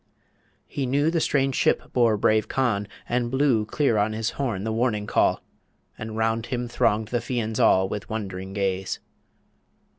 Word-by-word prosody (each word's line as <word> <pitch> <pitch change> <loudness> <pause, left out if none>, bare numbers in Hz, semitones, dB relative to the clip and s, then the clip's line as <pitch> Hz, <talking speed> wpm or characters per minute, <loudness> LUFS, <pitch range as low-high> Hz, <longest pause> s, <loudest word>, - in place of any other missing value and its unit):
He 135 -2 -3
knew 145 +5 +2
The 165 - +1
strange 135 -3 +1
ship - - +1
bore 115 -4 +3
brave 110 +1 +2
Conn, 110 -6 0 0.2
and 120 0 0
blew 130 -5 +2
Clear 115 -3 +1
on 105 +1 +1
his 110 +1 -2
horn 115 -9 -2
the 110 - -2
Warning 110 -2 0
Call; - - +2 0.5
And 110 0 -6
round 110 +1 0
him 125 -1 -2
thronged 110 -2 +1
the 120 - 0
Fians 115 -3 -2
all 95 0 +4
With 105 +1 -5
wond'ring 95 -3 -5
gaze. 95 -1 -1
110 Hz, 160 wpm, -25 LUFS, 105-125 Hz, 0.5 s, all